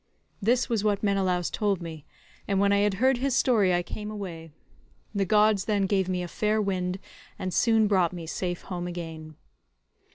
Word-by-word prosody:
This 240 +5 +2
was 225 -4 0
what 205 -1 +1
Menelaus 190 -3 +1
told 205 -4 0
me, 160 -3 -8 0.4
and 195 -1 +1
when 200 0 +3
I 200 - +3
had 205 -1 +2
heard 260 +4 +2
his 270 -1 0
story 215 -9 +3
I 175 0 +1
came 210 +4 -6
away; 180 -6 -7 0.6
the 200 -2 0
gods 210 0 +3
then 205 -2 +1
gave 190 -1 +1
me 180 -1 -1
a - - -4
fair 215 +5 0
wind 185 -3 -1 0.4
and 185 -1 -4
soon 225 -2 +3
brought 185 -5 +2
me 175 -2 -7
safe 175 +2 -3
home 175 -2 -5
again." 160 -3 -7
195 Hz, 185 wpm, -27 LUFS, 175-210 Hz, 0.6 s, when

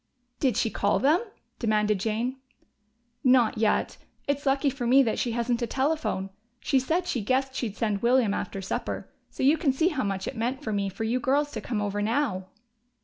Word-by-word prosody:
"Did 260 -4 +1
she 225 - +1
call 200 - +1
them?" 300 +7 +3 0.4
demanded 210 -3 +1
Jane. 230 +5 -1 0.9
"Not 250 -3 +4
yet. 220 -1 +1 0.3
It's 285 0 -1
lucky 275 +1 +2
for 250 -2 -3
me 270 +3 +6
that 225 - -1
she 240 - -1
hasn't 240 +1 0
a 235 - 0
telephone. 265 -8 -1 0.3
She 270 - +2
said 325 +8 0
she 250 -9 -1
guessed 260 +5 0
she'd 225 -5 -3
send 210 -3 -1
William 240 -3 +3
after 195 -1 -4
supper. 190 - -4 0.2
So - - -5
you 290 +4 +5
can 290 -4 +3
see 320 +7 +2
how 295 -7 -2
much 195 -1 -2
it - - -4
meant 250 +5 -2
to 220 - -2
me 200 -1 0
for 195 - -5
you 235 +3 0
girls 290 +3 +1
to 220 - -5
come 210 -1 -2
over 205 0 -2
now!" 215 -4 0
240 Hz, 200 wpm, -27 LUFS, 210-270 Hz, 0.9 s, me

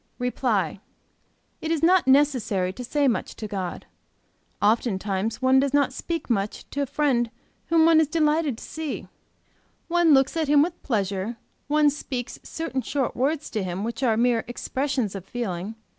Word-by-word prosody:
"REPLY. 230 - 0 0.8
It 320 - -3
is 325 -1 0
not 360 -2 +4
necessary 255 -10 +3
to 250 - -7
say 285 +3 +1
much 240 - -1
to 215 - -6
God. 190 -4 -4 0.7
Oftentimes 210 0 0
one 260 +1 +5
does 275 +1 +1
not 285 -2 +2
speak 335 -1 -4
much 205 -4 -2
to 285 - -2
a 280 - -1
friend 250 -5 +1 0.4
whom 330 -1 +4
one 325 -1 +6
is 310 - +2
delighted 305 -4 +1
to - - -10
see; 315 -2 -5 0.8
one 340 -3 +5
looks 270 +2 +2
at 320 -2 0
him 290 0 +5
with 345 +1 -4
pleasure; 205 -1 -2 0.3
one 300 0 +4
speaks 260 -4 -5
certain 320 -5 -4
short 270 -1 -2
words 290 +4 0
to 220 - -1
him 185 +1 -3
which 230 +2 -4
are 230 -4 +2
mere 235 -1 +2
expressions 260 -2 -2
of 195 -3 -6
feeling. 200 -2 -4
260 Hz, 165 wpm, -25 LUFS, 220-295 Hz, 0.8 s, one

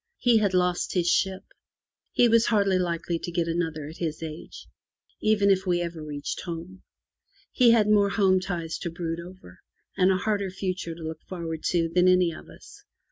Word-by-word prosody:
He 240 -3 +4
had 200 -3 +1
lost 180 0 0
his 175 -2 +1
ship; 190 +2 +1 0.7
he 245 - +4
was 230 0 +4
hardly 200 -4 +2
likely 170 -1 -2
to 175 - -6
get 170 -1 -1
another 165 -3 -2
at 160 - -10
his 160 -2 -4
age, 155 0 -8 0.6
even 210 -2 +3
if 190 0 +1
we 175 -1 +2
ever 170 -2 -5
reached 145 -1 -5
home; 175 +2 -7 0.7
he 250 -3 +4
had 225 -3 +5
more 205 -1 +4
home 190 -2 +3
ties 170 -3 -4
to 170 - -4
brood 165 0 -4
over, 170 - -12 0.4
and 185 - +3
a 190 - +3
harder 200 0 -1
future 185 -3 -4
to 165 - -10
look 160 0 -6
forward 165 -3 -5
to, 170 -2 +1
than 180 +2 +2
any 180 -2 +4
of 155 - -11
us. - - -15
180 Hz, 190 wpm, -26 LUFS, 165-195 Hz, 0.7 s, had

